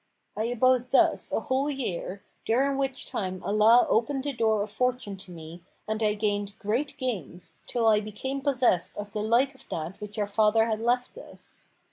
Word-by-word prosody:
I 215 - -1
abode 250 +1 +2
thus 275 - +3
a - - 0
whole 265 +3 0
year, 200 -8 -4 0.2
during 270 +4 +2
which 270 -1 -2
time 185 -2 -3
Allah 215 +4 +5
opened 260 +4 +1
the 285 0 -2
door 220 -3 +2
of 210 - -7
fortune 250 -2 -1
to 190 -1 -12
me 165 0 -10 0.3
and 215 +1 -2
I 210 -1 +2
gained 205 -1 -1
great 235 +10 -2
gains, 190 - -5
till 235 -2 +1
I 215 -1 +6
became 215 +6 -4
possessed 255 - +1
of 205 0 -6
the 210 - -3
like 240 +6 +2
of 265 - -18
that 165 +5 -5
which 210 0 -7
our 210 - +1
father 215 +2 +3
had 220 -1 -1
left 245 - 0
us. - - -9
220 Hz, 185 wpm, -27 LUFS, 205-255 Hz, 0.3 s, I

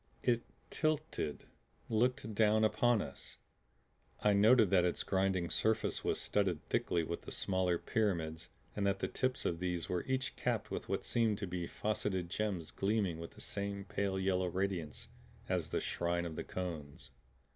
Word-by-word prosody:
It 120 -2 +3 0.3
tilted; 155 - -1 0.4
looked 115 -1 +1
down 110 +1 +4
upon 110 +1 +3
us! 70 - -10 0.8
I 105 - +4
noted 110 0 +6
that 90 -2 +5
its 90 - +1
grinding 95 -2 +1
surface 110 0 +1
was - - 0
studded 95 -7 0
thickly 85 -1 +1
with 85 +2 -4
the - - -9
smaller 95 -2 +1
pyramids 85 -7 -1 0.3
and 100 -1 +1
that 100 0 +2
the - - -1
tips 130 0 -1
of 85 - 0
these 90 -2 -2
were 90 -1 0
each 130 0 -1
capped - - -1
with - - -4
what - - -1
seemed 115 -3 +2
to 100 - -3
be 90 -2 -3
faceted 95 -4 -1
gems 100 -6 -2
gleaming 100 -4 0
with 85 - -7
the - - -11
same 100 0 -3
pale 95 0 -1
yellow 95 -1 +1
radiance 90 -5 -2 0.4
as - - 0
the - - 0
Shrine 85 0 -1
of 80 -2 -5
the - - -3
Cones. 80 -6 -6
95 Hz, 165 wpm, -35 LUFS, 85-110 Hz, 0.8 s, noted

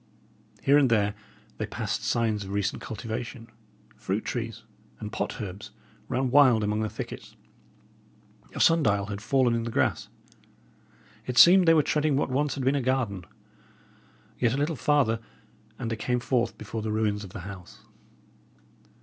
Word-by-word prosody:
Here 140 +2 +5
and 135 -3 +3
there, 105 -3 +2 0.5
they - - -2
passed - - -3
signs 110 -3 0
of 95 - -9
recent 100 +1 -2
cultivation; 115 +2 -6 0.5
fruit 100 +3 -3
trees 115 -2 -4 0.4
and 105 -1 -6
pot - - -3
herbs 100 -2 -7 0.4
ran 130 0 -1
wild 130 -6 +5
among 105 +1 0
the 110 0 -1
thicket; - - -8 1.2
a - - -4
sun 165 0 +5
dial 100 -7 +1
had 100 -1 -6
fallen 130 +1 +2
in 115 - 0
the 115 - -4
grass; - - 0 1.2
it 125 -1 -3
seemed 180 0 +8
they 165 - +7
were 155 - +4
treading 150 -1 +1
what 135 - -1
once 145 +2 0
had 135 -2 -4
been 135 - +3
a 140 - 0
garden. 120 -8 -1 1.1
Yet 120 -1 +2
a - - -2
little 150 +3 0
farther 135 -6 +2 0.6
and 115 - -4
they - - 0
came 125 +3 -1
forth 120 0 -1
before 110 - -6
the 110 0 -3
ruins 105 -1 0
of 95 - -9
the 105 - -6
house. 95 -1 -10
115 Hz, 165 wpm, -27 LUFS, 105-135 Hz, 1.2 s, seemed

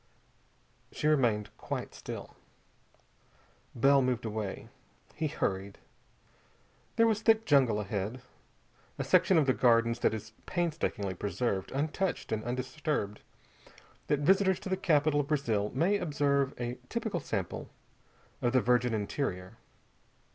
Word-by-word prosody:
She - - -5
remained 120 -9 +2
quite - - -5
still. - - -8 1.4
Bell 135 +3 +5
moved 125 -2 0
away. 105 -3 -4 0.5
He 155 0 -1
hurried. 100 -8 -2 1.2
There 230 - +5
was 220 -2 +2
thick 225 0 +4
jungle 130 - +4
ahead, 105 +4 -3 0.7
a - - -2
section 185 0 +4
of 155 - +4
the 130 - +3
Gardens 115 -1 +3
that 110 - +2
is 110 +1 -8 0.2
painstakingly 155 - -1
preserved 100 +1 -2
untouched 155 +7 -2
and 110 -1 -1
undisturbed, 130 -2 -3 0.9
that 145 -1 +1
visitors 190 +3 +3
to - - -6
the 190 - +2
capital 155 -5 +2
of 145 - -1
Brazil 115 -9 0
may 180 +10 +2
observe 140 -5 0
a 120 0 -4
typical 220 -6 -2
sample 100 - -4 0.7
of 120 0 +1
the 130 - +5
virgin 125 -1 +2
interior. 100 -4 -3
130 Hz, 125 wpm, -30 LUFS, 110-155 Hz, 1.4 s, Bell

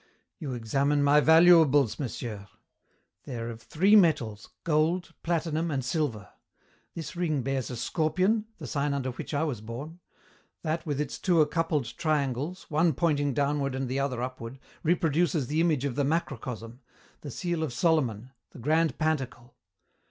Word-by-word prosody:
"You 140 -7 -4
examine 140 +5 +1
my 145 +1 +5
valuables, 160 -5 +6
monsieur. 110 -6 -5 0.8
They 125 - -5
are 115 0 -4
of 115 0 -10
three 190 - +3
metals, 120 - +2
gold, 165 +3 +1
platinum, 165 -1 -1
and 135 -4 -2
silver. 125 - -2 0.7
This 155 -1 -6
ring 155 -6 0
bears 135 -1 -2
a 125 - -5
scorpion, 185 - +1
the 155 - -8
sign 140 +4 -1
under 130 -2 -2
which 125 - -7
I 145 - +1
was 135 -9 -3
born. 135 +10 -8 0.6
That 160 +1 -2
with 145 -2 -1
its 150 -2 -3
two 175 -4 +2
accoupled 150 -6 -1
triangles, 150 +3 -1
one 160 +1 +2
pointing 145 -3 +1
downward 140 -1 0
and 130 0 -2
the 130 +2 -2
other 130 -3 -1
upward, 125 -1 -6 0.2
reproduces 165 -3 +1
the 150 +6 0
image 155 -5 +1
of 140 - -1
the 145 - 0
macrocosm, 125 -6 -3 0.4
the 145 - -8
seal 170 +4 -3
of 155 -5 -2
Solomon, 130 - 0 0.2
the - - -14
grand 155 +6 +1
pantacle. 130 -6 -2
145 Hz, 155 wpm, -28 LUFS, 125-160 Hz, 0.8 s, valuables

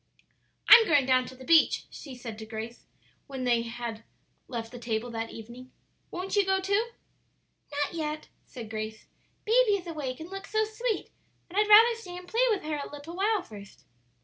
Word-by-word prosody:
"I'm 460 -2 +10
going 290 -5 +4
down 255 -1 +3
to 260 - -10
the 260 0 -12
beach," 325 +1 +4
she 275 -4 -9
said 230 -3 -8
to 220 - -7
Grace, 225 +2 -7 0.4
when 265 -2 -5
they 240 -2 +2
had 230 -1 -6 0.4
left 230 -3 -5
the 245 - -9
table 235 0 -3
that 225 0 -4
evening; 240 +3 -11 0.4
"won't 370 +3 -4
you 410 - +5
go 385 0 +1
too?" 400 +4 +1 0.8
"Not 290 +2 -1
yet," 305 -2 -4 0.2
said 230 -4 -10
Grace; 215 0 -5 0.4
"baby 460 0 +4
is 385 -3 -1
awake, 295 -7 -5
and 325 +3 -9
looks 390 0 -7
so 435 0 +2
sweet 440 +1 -3 0.4
that 365 - -7
I'd 420 0 +2
rather 455 +2 +7
stay 360 -4 -8
and 360 0 -10
play 475 +6 +2
with 420 -4 0
her 300 -1 -3
a - - -9
little 290 +4 -9
while 405 +1 +1
first." 200 -2 -13
290 Hz, 190 wpm, -28 LUFS, 235-390 Hz, 0.8 s, I'm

